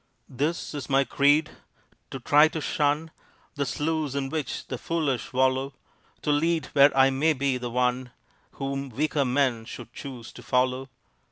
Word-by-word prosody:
This 150 Hz, +8 st, -2 dB
is 145 Hz, -5 st, -6 dB
my 135 Hz, 0 st, +4 dB
creed: 145 Hz, +3 st, +3 dB, 0.6 s
To 135 Hz, -, -6 dB
try 145 Hz, +5 st, +5 dB
to 160 Hz, -, -5 dB
shun 150 Hz, +2 st, 0 dB, 0.4 s
The 140 Hz, -2 st, -2 dB
sloughs 150 Hz, +3 st, -2 dB
in 135 Hz, -1 st, -2 dB
which 155 Hz, -5 st, -4 dB
the 130 Hz, -, -6 dB
foolish 150 Hz, -7 st, -2 dB
wallow; 130 Hz, +1 st, +1 dB, 0.5 s
To 150 Hz, -, +1 dB
lead 160 Hz, +2 st, +1 dB
where 140 Hz, 0 st, +7 dB
I 135 Hz, 0 st, +6 dB
may 150 Hz, +4 st, +2 dB
be 135 Hz, -2 st, 0 dB
the 120 Hz, -1 st, -4 dB
one 125 Hz, +1 st, 0 dB, 0.4 s
Whom 135 Hz, 0 st, -4 dB
weaker 145 Hz, +3 st, 0 dB
men 125 Hz, -3 st, +1 dB
should 120 Hz, 0 st, -10 dB
choose 125 Hz, -5 st, -8 dB
to -, -, -11 dB
follow. 130 Hz, +2 st, 0 dB
140 Hz, 160 wpm, -26 LUFS, 130-150 Hz, 0.6 s, where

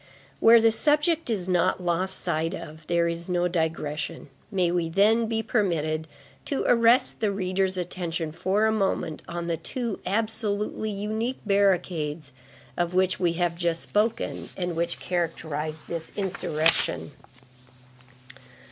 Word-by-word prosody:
Where 230 Hz, +1 st, +8 dB
the 225 Hz, 0 st, +4 dB
subject 300 Hz, +5 st, +3 dB
is 195 Hz, -6 st, -1 dB
not 185 Hz, 0 st, +2 dB
lost 180 Hz, +2 st, -1 dB
sight 165 Hz, -1 st, -1 dB
of, 155 Hz, +1 st, -10 dB
there 170 Hz, -1 st, +2 dB
is 170 Hz, +1 st, -3 dB
no 180 Hz, 0 st, +1 dB
digression; 160 Hz, -4 st, -3 dB, 0.2 s
may 185 Hz, -5 st, +1 dB
we, 170 Hz, -2 st, 0 dB
then, 215 Hz, +6 st, +3 dB
be 225 Hz, 0 st, -1 dB
permitted 160 Hz, -8 st, 0 dB, 0.4 s
to 280 Hz, -, -1 dB
arrest 235 Hz, +1 st, +4 dB
the 215 Hz, -2 st, +1 dB
reader's 190 Hz, -1 st, 0 dB
attention 175 Hz, -2 st, -3 dB
for 190 Hz, +6 st, +1 dB
a 220 Hz, -, +3 dB
moment 195 Hz, -7 st, -1 dB
on 170 Hz, 0 st, -4 dB
the 170 Hz, -1 st, -1 dB
two 235 Hz, 0 st, -3 dB
absolutely 215 Hz, +1 st, -1 dB
unique 215 Hz, +5 st, -2 dB
barricades 175 Hz, -7 st, +1 dB, 0.4 s
of 175 Hz, 0 st, -1 dB
which 185 Hz, 0 st, +2 dB
we 175 Hz, -2 st, +2 dB
have 175 Hz, 0 st, 0 dB
just 170 Hz, -1 st, 0 dB
spoken 215 Hz, +2 st, -1 dB
and 175 Hz, -2 st, -2 dB
which 170 Hz, +1 st, -1 dB
characterized 160 Hz, -3 st, -3 dB
this 165 Hz, -1 st, -5 dB
insurrection. 165 Hz, -6 st, +1 dB
180 Hz, 135 wpm, -26 LUFS, 165-210 Hz, 0.4 s, Where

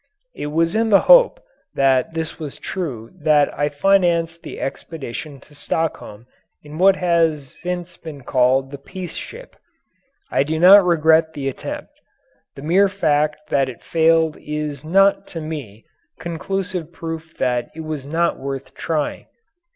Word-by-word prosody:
It -, -, -5 dB
was 165 Hz, +3 st, +1 dB
in 225 Hz, +1 st, +1 dB
the 200 Hz, -, +6 dB
hope -, -, +6 dB, 0.4 s
that 135 Hz, +1 st, +2 dB
this 160 Hz, 0 st, -4 dB
was 150 Hz, -4 st, -6 dB
true 135 Hz, -12 st, -5 dB
that 150 Hz, -1 st, +3 dB
I 145 Hz, +1 st, 0 dB
financed 170 Hz, 0 st, +2 dB
the -, -, -8 dB
expedition 140 Hz, 0 st, -6 dB
to 150 Hz, -, -20 dB
Stockholm 145 Hz, -7 st, -4 dB, 0.4 s
in 150 Hz, +2 st, -9 dB
what 190 Hz, +1 st, +6 dB
has 165 Hz, -6 st, 0 dB
since 180 Hz, 0 st, -4 dB
been 155 Hz, -4 st, -9 dB
called 130 Hz, +2 st, +2 dB
the 140 Hz, -, -8 dB
"Peace 180 Hz, +4 st, -8 dB
Ship." -, -, -9 dB, 0.8 s
I -, -, +2 dB
do 155 Hz, +3 st, -1 dB
not 190 Hz, +4 st, +8 dB
regret 160 Hz, -2 st, +3 dB
the 140 Hz, -2 st, -4 dB
attempt. 135 Hz, -, -6 dB, 0.6 s
The 135 Hz, -, -10 dB
mere 190 Hz, +6 st, +4 dB
fact 150 Hz, -3 st, 0 dB
that 135 Hz, -1 st, +2 dB
it 125 Hz, -, -11 dB
failed 160 Hz, -1 st, +2 dB
is 150 Hz, -2 st, -5 dB
not, 195 Hz, +5 st, +3 dB
to 165 Hz, -, -6 dB
me, 145 Hz, -10 st, -7 dB, 0.3 s
conclusive 180 Hz, 0 st, -4 dB
proof 165 Hz, -1 st, -7 dB
that 125 Hz, -2 st, 0 dB
it 160 Hz, -, -6 dB
was 155 Hz, -3 st, -5 dB
not 170 Hz, +3 st, 0 dB
worth 135 Hz, 0 st, -6 dB
trying. 155 Hz, -3 st, -3 dB
160 Hz, 150 wpm, -20 LUFS, 145-170 Hz, 0.8 s, not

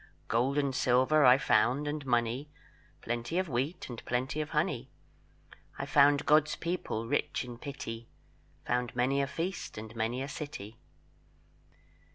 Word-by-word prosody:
Gold 125 Hz, -, +1 dB
and 140 Hz, -2 st, +1 dB
silver 130 Hz, +5 st, +3 dB
I 125 Hz, +1 st, +8 dB
found, 125 Hz, +4 st, +2 dB
and 145 Hz, 0 st, -3 dB
money, 120 Hz, +4 st, 0 dB, 0.5 s
Plenty 120 Hz, +8 st, -3 dB
of 185 Hz, 0 st, +1 dB
wheat, 140 Hz, +7 st, -2 dB
and 120 Hz, -3 st, -8 dB
plenty 130 Hz, +5 st, -1 dB
of 155 Hz, -, -4 dB
honey; 150 Hz, -5 st, -1 dB, 0.9 s
I 140 Hz, -, -3 dB
found 145 Hz, 0 st, +4 dB
God's 150 Hz, 0 st, +4 dB
people 170 Hz, -10 st, -3 dB
rich 145 Hz, -1 st, -1 dB
in 120 Hz, -1 st, -9 dB
pity, 120 Hz, -5 st, -7 dB, 0.6 s
Found 125 Hz, 0 st, -1 dB
many 130 Hz, +3 st, +2 dB
a 140 Hz, -, 0 dB
feast, 170 Hz, -, -4 dB
and 110 Hz, +1 st, -8 dB
many 115 Hz, +4 st, -1 dB
a -, -, -4 dB
city." 120 Hz, -8 st, -7 dB
130 Hz, 145 wpm, -31 LUFS, 120-150 Hz, 0.9 s, I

